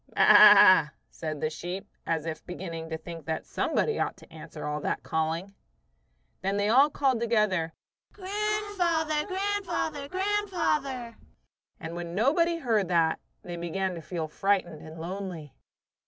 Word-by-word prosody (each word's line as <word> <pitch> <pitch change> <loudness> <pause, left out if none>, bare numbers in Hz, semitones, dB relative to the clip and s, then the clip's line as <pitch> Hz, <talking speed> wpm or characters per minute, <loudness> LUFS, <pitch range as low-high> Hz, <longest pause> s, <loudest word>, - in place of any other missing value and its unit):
"Baa," 195 -6 +8 0.2
said 155 -2 -5
the 155 - -1
sheep, 180 +5 -6 0.2
as 160 -2 -1
if 160 -1 -5
beginning 165 -3 -6
to 160 - -3
think 165 -2 -10
that 160 0 -3
somebody 450 - -1
ought - - -1
to - - -17
answer - - -9
all 150 0 -2
that - - -2
calling. 165 +5 -2 0.9
Then 195 +2 -1
they 205 +1 +1
all 270 +6 +6
called 270 -4 +1
together: 210 -8 +1 0.4
"Grandfather! 385 -6 -1
Grandfather! 375 -7 -2
Grandfather!" 355 - -1 0.6
and 165 +1 -7
when 170 0 -6
nobody 335 - +2
heard 225 - +1
that, 165 -2 +2 0.2
they 175 -1 -6
began 180 +3 -2
to 170 - -7
feel 165 -1 -4
frightened 175 -2 -1
and 160 +1 -10
lonely. 175 -3 -6
195 Hz, 140 wpm, -28 LUFS, -, 0.9 s, Baa